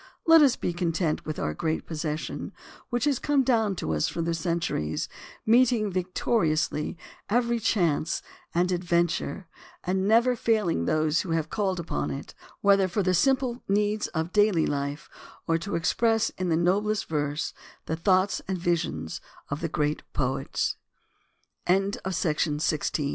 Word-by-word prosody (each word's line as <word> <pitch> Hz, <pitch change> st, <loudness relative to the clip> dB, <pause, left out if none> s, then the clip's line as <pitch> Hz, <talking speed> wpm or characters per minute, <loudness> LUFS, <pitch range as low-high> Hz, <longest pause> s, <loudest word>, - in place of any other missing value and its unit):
Let 325 Hz, -1 st, +8 dB
us 270 Hz, -4 st, +5 dB
be 175 Hz, -, -2 dB
content 170 Hz, -2 st, -1 dB
with 155 Hz, -, -3 dB
our 75 Hz, -, -1 dB
great 160 Hz, -, -2 dB
possession, 155 Hz, -1 st, -4 dB, 0.4 s
which 240 Hz, 0 st, -1 dB
has 285 Hz, -3 st, +2 dB
come 285 Hz, -2 st, +2 dB
down 225 Hz, -6 st, +2 dB
to 80 Hz, -, -2 dB
us 75 Hz, -, +1 dB
through 165 Hz, -, -3 dB
the 170 Hz, 0 st, 0 dB
centuries, 165 Hz, -, -1 dB, 0.4 s
meeting 230 Hz, -2 st, +4 dB
victoriously 175 Hz, -4 st, 0 dB, 0.3 s
every 235 Hz, +1 st, +2 dB
chance 170 Hz, -7 st, +1 dB, 0.3 s
and 180 Hz, +1 st, +2 dB
adventure 175 Hz, +1 st, 0 dB, 0.4 s
and 190 Hz, +1 st, 0 dB
never 235 Hz, +3 st, +4 dB
failing 215 Hz, -, +1 dB
those 155 Hz, -, +2 dB
who 170 Hz, -, -3 dB
have 160 Hz, -2 st, -1 dB
called 190 Hz, -4 st, 0 dB
upon 75 Hz, -, -2 dB
it, 70 Hz, -, -6 dB, 0.3 s
whether 200 Hz, -1 st, +5 dB
for 195 Hz, +3 st, -1 dB
the 185 Hz, 0 st, +2 dB
simple 255 Hz, +4 st, +2 dB
needs 210 Hz, +1 st, +1 dB
of 160 Hz, +1 st, -3 dB
daily 205 Hz, -6 st, +4 dB
life 140 Hz, +1 st, -3 dB, 0.4 s
or 165 Hz, 0 st, +1 dB
to 200 Hz, +4 st, -4 dB
express 225 Hz, +6 st, +2 dB
in 185 Hz, -1 st, -3 dB
the 160 Hz, -, +2 dB
noblest 200 Hz, +5 st, +1 dB
verse 150 Hz, -1 st, -2 dB, 0.3 s
the 160 Hz, -, -2 dB
thoughts 185 Hz, +3 st, +2 dB
and 190 Hz, -1 st, -1 dB
visions 160 Hz, -, -2 dB, 0.3 s
of 150 Hz, +4 st, -3 dB
180 Hz, 135 wpm, -27 LUFS, 160-215 Hz, 0.4 s, Let